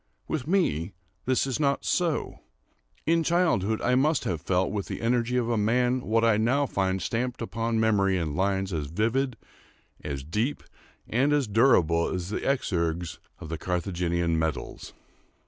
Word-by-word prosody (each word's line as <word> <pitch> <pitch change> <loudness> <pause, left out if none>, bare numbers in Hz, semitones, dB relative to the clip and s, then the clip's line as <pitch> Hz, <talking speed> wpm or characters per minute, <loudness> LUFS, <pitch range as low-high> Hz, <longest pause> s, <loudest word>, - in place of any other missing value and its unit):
With 155 -3 -3
me 105 - +1 0.3
this 130 +1 +2
is 135 +1 -2
not 140 -2 +1
so. 170 -4 0 0.7
In 165 +1 +3
childhood 160 - +1
I 125 - +2
must 150 +5 +2
have 85 -5 -2
felt 90 +2 0
with 100 -2 -3
the - - -5
energy 120 +1 +1
of 120 -2 0
a 115 -2 +1
man 125 +4 +2
what 115 0 +1
I 115 -2 +4
now 130 +6 +2
find 95 -6 -1
stamped 120 +6 -2
upon 115 +1 -2
memory 100 -4 +2
in 80 -4 -2
lines 95 +1 0
as 75 -3 -2
vivid, 115 - 0 0.7
as 70 -2 -4
deep, 105 - -2 0.4
and 130 +5 +2
as 145 -2 +2
durable 100 - +3
as 90 -1 -3
the - - -2
exergues 85 - -1 0.2
of 80 - -9
the 80 -1 -4
Carthaginian 85 -2 -1
medals. 80 -5 -4
110 Hz, 160 wpm, -27 LUFS, 90-125 Hz, 0.7 s, I